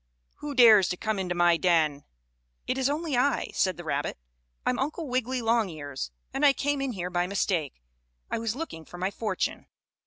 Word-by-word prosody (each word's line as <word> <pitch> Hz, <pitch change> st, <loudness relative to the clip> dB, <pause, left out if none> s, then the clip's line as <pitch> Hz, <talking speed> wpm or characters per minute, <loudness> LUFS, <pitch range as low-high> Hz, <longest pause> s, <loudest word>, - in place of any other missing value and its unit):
Who 295 Hz, -1 st, -6 dB
dares 220 Hz, -7 st, +7 dB
to 180 Hz, -, -2 dB
come 215 Hz, 0 st, -2 dB
into 180 Hz, -2 st, -2 dB
my 175 Hz, -1 st, +4 dB
den?" 155 Hz, -5 st, +2 dB, 0.6 s
"It 255 Hz, -, -1 dB
is 265 Hz, +1 st, +2 dB
only 305 Hz, -1 st, -1 dB
I," 265 Hz, +4 st, +1 dB
said 185 Hz, -1 st, +1 dB
the 175 Hz, -, -7 dB
rabbit. 145 Hz, -3 st, -2 dB, 0.5 s
"I'm -, -, +1 dB
Uncle 305 Hz, +4 st, -2 dB
Wiggily 255 Hz, -1 st, -1 dB
Longears, 160 Hz, -, -1 dB, 0.2 s
and 275 Hz, -, -2 dB
I 285 Hz, -1 st, +7 dB
came 285 Hz, 0 st, -1 dB
in 270 Hz, -2 st, -2 dB
here 180 Hz, -2 st, -4 dB
by 175 Hz, 0 st, 0 dB
mistake. 170 Hz, -, -1 dB, 0.4 s
I -, -, -2 dB
was 225 Hz, 0 st, -2 dB
looking 265 Hz, -, -6 dB
for 175 Hz, -, -12 dB
my 185 Hz, +2 st, -1 dB
fortune." 205 Hz, -3 st, -3 dB
205 Hz, 185 wpm, -27 LUFS, 175-260 Hz, 0.6 s, dares